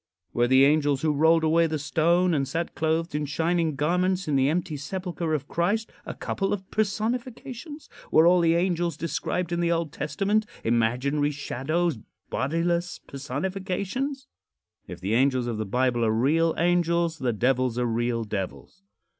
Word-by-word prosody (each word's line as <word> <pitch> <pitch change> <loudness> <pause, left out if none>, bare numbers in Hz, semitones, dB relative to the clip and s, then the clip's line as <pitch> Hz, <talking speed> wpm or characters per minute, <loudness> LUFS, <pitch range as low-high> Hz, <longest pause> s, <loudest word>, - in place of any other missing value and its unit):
Were 120 0 +2
the 130 +2 +6
angels 145 -1 +2
who 155 -1 +2
rolled 160 +2 +4
away 165 +1 +3
the 160 -1 -2
stone 170 +4 +2
and 135 -3 0
sat 165 +5 -3
clothed 160 +2 -1
in 150 0 -2
shining 165 +1 0
garments 180 +5 0
in 150 - +1
the 135 0 +3
empty 170 0 -1
sepulcher 170 +2 -3
of 140 -2 -4
Christ 200 +7 -1 0.2
a - - -5
couple 195 -1 -2
of 190 -2 -5
personifications? 245 - -3 0.2
Were 160 - +5
all 180 +1 +5
the 165 0 +3
angels 170 -2 0
described 170 +2 -2
in 170 - 0
the 170 0 +1
Old 165 -3 -1
Testament 200 +9 0 0.2
imaginary 125 +6 +1
shadows 150 +1 -2 0.3
bodiless 170 +4 -1
personifications? 190 - -4 0.6
If 90 -1 -8
the 95 +4 -2
angels 130 0 +2
of 115 -3 -3
the 110 - -3
Bible 125 +2 +1
are 110 - +2
real 155 +9 +2
angels, 170 -1 +1
the 125 -2 0
devils 125 +2 +1
are 125 - +1
real 115 0 0
devils. 105 - -6
160 Hz, 160 wpm, -26 LUFS, 135-175 Hz, 0.6 s, the